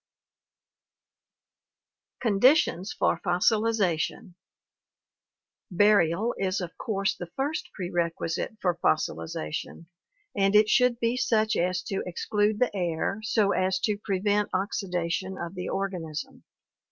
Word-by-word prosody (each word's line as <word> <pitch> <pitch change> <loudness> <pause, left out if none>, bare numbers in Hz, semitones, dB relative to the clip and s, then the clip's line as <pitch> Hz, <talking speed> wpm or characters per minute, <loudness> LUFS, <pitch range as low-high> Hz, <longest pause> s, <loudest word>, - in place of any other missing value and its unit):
Conditions 220 - +3
for - - +1
Fossilization 190 -2 +1 1.4
Burial 205 +2 +3
is 190 -1 0
of 180 -2 -6
course 200 -5 -1
the 175 - -7
first 285 +4 -2
prerequisite 175 +2 -2
for 175 -2 0
fossilization 80 - -2 0.5
and 195 0 +2
it 210 0 +6
should 250 0 +3
be 235 +1 0
such 220 -3 +2
as 180 0 0
to 195 +1 -3
exclude 210 +4 0
the 245 -2 0
air 175 +2 -1
so 215 -2 +2
as 185 0 +1
to 210 -2 0
prevent 205 0 0
oxidation 185 -1 -2
of 170 -1 -5
the 180 -1 -5
organism. 180 -6 -4
195 Hz, 105 wpm, -27 LUFS, 175-215 Hz, 1.4 s, it